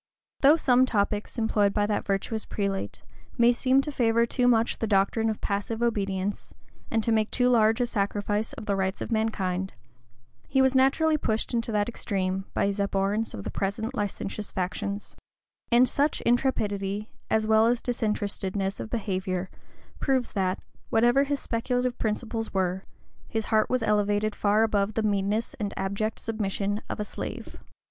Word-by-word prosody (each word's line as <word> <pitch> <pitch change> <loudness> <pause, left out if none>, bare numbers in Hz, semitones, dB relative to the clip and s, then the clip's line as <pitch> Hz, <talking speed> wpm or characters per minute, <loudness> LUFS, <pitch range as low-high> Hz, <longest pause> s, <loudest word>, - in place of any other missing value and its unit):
Though 290 +3 +7
some 255 -5 +4
topics 210 0 -1
employed 210 -3 +2
by 205 -1 +2
that 210 0 -1
virtuous 205 +3 -1
prelate 200 -2 -3 0.3
may 240 0 +6
seem 260 +2 +3
to 295 - -4
favor 235 -3 +2
too 245 +1 +1
much 230 -1 +2
the 225 - -1
doctrine 205 +2 +2
of 215 - -3
passive 205 +3 -2
obedience, 200 -3 -2 0.3
and 225 -1 0
to 230 - +1
make 220 -1 +2
too 250 -1 +2
large 225 -1 +4
a 245 - +3
sacrifice 205 -1 -1
of - - -8
the 200 - 0
rights 190 0 -1
of - - -4
mankind, 190 -4 -1 0.7
he 270 - +1
was 265 -1 +4
naturally 285 +4 +3
pushed 220 -3 -1
into 230 -1 0
that 205 -1 +1
extreme 190 -4 -2
by - - +2
his 200 0 -1
abhorrence 200 +2 0
of 100 - -6
the - - -4
present 215 +5 -2
licentious 205 -1 -4
factions; 200 +2 -3 0.6
and 245 +2 +6
such 290 +4 +1
intrepidity, 210 -5 0 0.2
as 220 0 +2
well 220 +1 +5
as 240 0 +2
disinterestedness 205 -4 -2
of - - -5
behavior, 190 -5 -2 0.5
proves 260 -3 0
that, 190 -2 0 0.3
whatever 240 +5 +4
his 285 0 -1
speculative 245 +1 -1
principles 225 +1 -2
were 190 0 -1 0.4
his 220 -1 -2
heart 215 0 +3
was 255 -2 +1
elevated 210 0 +1
far 210 +2 +2
above 210 -1 +1
the 225 - 0
meanness 205 +2 0
and 205 -2 -3
abject 200 +3 -2
submission 205 -2 -2
of - - -4
a 210 - -1
slave. - - -7
215 Hz, 165 wpm, -27 LUFS, 200-235 Hz, 0.7 s, Though